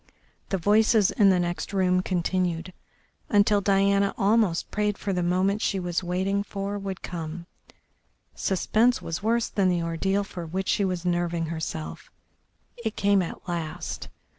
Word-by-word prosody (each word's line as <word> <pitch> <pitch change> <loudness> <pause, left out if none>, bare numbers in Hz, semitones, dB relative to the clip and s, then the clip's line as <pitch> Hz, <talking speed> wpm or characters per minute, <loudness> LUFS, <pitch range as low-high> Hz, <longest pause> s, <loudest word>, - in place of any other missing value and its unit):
The 195 - 0
voices 210 +2 +4
in 205 -3 +4
the 185 -2 +4
next 175 +1 -3
room 185 -1 +2
continued, 180 -1 -1 0.6
until 205 0 +4
Diana 200 0 +2
almost 200 -4 +2
prayed 210 -1 0
for 200 - -2
the 180 - 0
moment 185 +4 +1
she 195 - 0
was 175 0 -2
waiting 190 +3 0
for 200 0 -4
would 195 -1 -6
come; 170 -1 -5 0.9
suspense 220 +6 +2
was 165 - -5
worse 230 +2 +1
than 195 -3 +1
the 175 -2 +1
ordeal 190 +5 0
for 185 -3 -7
which 190 +4 -3
she 205 - +2
was 180 -2 -2
nerving 175 -1 0
herself, 80 - -5 0.7
It 220 -1 -2
came 200 -1 +3
at 180 - -6
last. 170 -3 -4
190 Hz, 150 wpm, -26 LUFS, 175-200 Hz, 0.9 s, voices